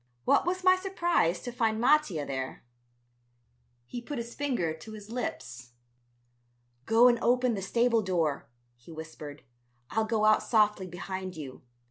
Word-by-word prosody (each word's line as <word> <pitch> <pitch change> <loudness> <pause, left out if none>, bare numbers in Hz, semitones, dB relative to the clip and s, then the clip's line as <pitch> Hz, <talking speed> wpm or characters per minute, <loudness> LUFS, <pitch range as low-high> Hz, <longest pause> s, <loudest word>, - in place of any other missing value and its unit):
What - - +3
was 365 +1 -1
my 370 0 +6
surprise 345 - 0
to 245 - -5
find 225 -2 0
Mattia 240 - +3
there. 130 -1 -5 1.2
He 240 - -6
put 285 +3 -6
his 235 0 -5
finger 245 - -1
to 190 +8 -11
his 215 0 -10
lips. 125 - -5 1.1
"Go 230 +2 +6
and 240 -1 +3
open 250 0 +2
the 200 - -3
stable 235 +3 +2
door," 165 - -1 0.3
he 120 +6 -16
whispered, 155 -2 -9 0.5
"I'll 220 0 +1
go 220 -1 +1
out 215 0 +5
softly 210 -4 +2
behind 185 0 -6
you. 135 -4 -8
215 Hz, 145 wpm, -29 LUFS, 160-245 Hz, 1.2 s, my